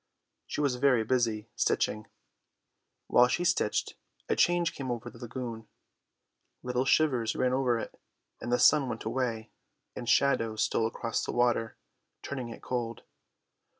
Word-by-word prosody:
She - - -3
was 135 -4 +1
very 125 -3 +3
busy, 115 -2 0
stitching. 105 0 0 1.0
While 125 0 +5
she 175 +7 -1
stitched 175 -11 +1 0.3
a - - +1
change 175 -1 +2
came 135 - -6
to 120 -1 -4
the 115 - -15
lagoon. 115 -2 -6 1.0
Little 125 +1 -1
shivers 130 -7 +2
ran 125 0 +1
over 130 -3 +2
it, - - -7 0.4
and 120 - -5
the 125 - +4
sun 140 -2 +5
went 115 -1 -5
away 115 -1 -2 0.4
and 120 - -5
shadows 115 -5 +2
stole 110 +2 +1
across 115 0 -3
the - - -3
water, 120 -2 +1 0.5
turning 130 -4 -5
it 115 - -10
cold. 120 -2 -3
120 Hz, 145 wpm, -29 LUFS, 115-130 Hz, 1.0 s, While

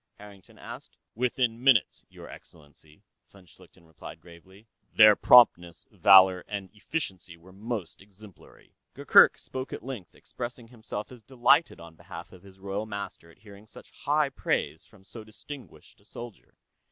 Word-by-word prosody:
Harrington 100 -2 -16
asked. - - -12 0.2
"Within 120 0 -2
minutes, 130 -7 +2
Your - - -13
Excellency," 75 0 -17 0.3
von 100 -2 -20
Schlichten 90 0 -21
replied 80 0 -13
gravely. 90 +5 -18 0.2
"Their 110 -1 +7
promptness, 90 -10 +4
valor, 95 -1 +5
and 100 -2 -7
efficiency 100 - -5
were 90 +3 -19
most 105 -3 -7
exemplary." 100 -3 -19 0.2
Gurgurk - - +5
spoke 130 0 -8
at - - -8
length, 125 -9 -9
expressing 120 -1 -9
himself 110 -3 -8
as 125 -2 -14
delighted, 130 +6 +1
on 85 -1 -13
behalf - - -12
of 90 - -16
his 95 0 -18
royal 100 +2 -5
master, 100 -5 -8
at 85 - -21
hearing 100 0 -16
such - - -16
high 150 0 -1
praise 135 - -3
from - - -22
so 110 +3 -12
distinguished 115 - -13
a - - -28
soldier. 120 -3 -12
100 Hz, 150 wpm, -26 LUFS, 90-120 Hz, 0.3 s, Their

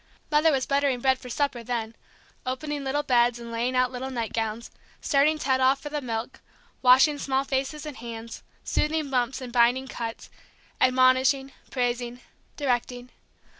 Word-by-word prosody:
Mother 305 +2 +4
was 265 -3 0
buttering 280 -2 +1
bread 260 +1 +2
for 250 - -10
supper, 275 -1 -1
then; 230 -1 -3 0.5
opening 285 +3 -3
little 280 +2 -1
beds 240 -3 +3
and 235 -1 -9
laying 240 +2 -1
out 255 0 +2
little 260 +1 -5
nightgowns, 230 -2 -3 0.3
starting 295 +2 +3
Ted 260 -3 +1
off 265 +1 +4
for 295 - -7
the 295 0 -3
milk, 230 -2 -5 0.4
washing 265 +4 +6
small 270 0 0
hands 270 0 -1
and 300 -3 -6
faces, 230 -1 -8 0.2
soothing 300 -2 -1
bumps 255 +1 0
and 245 -2 -7
binding 245 +2 +3
cuts, 230 -3 -6 0.5
admonishing, 260 +1 +4 0.2
praising, 245 -1 -2 0.4
directing. 245 -2 -2
255 Hz, 150 wpm, -26 LUFS, 240-275 Hz, 0.5 s, washing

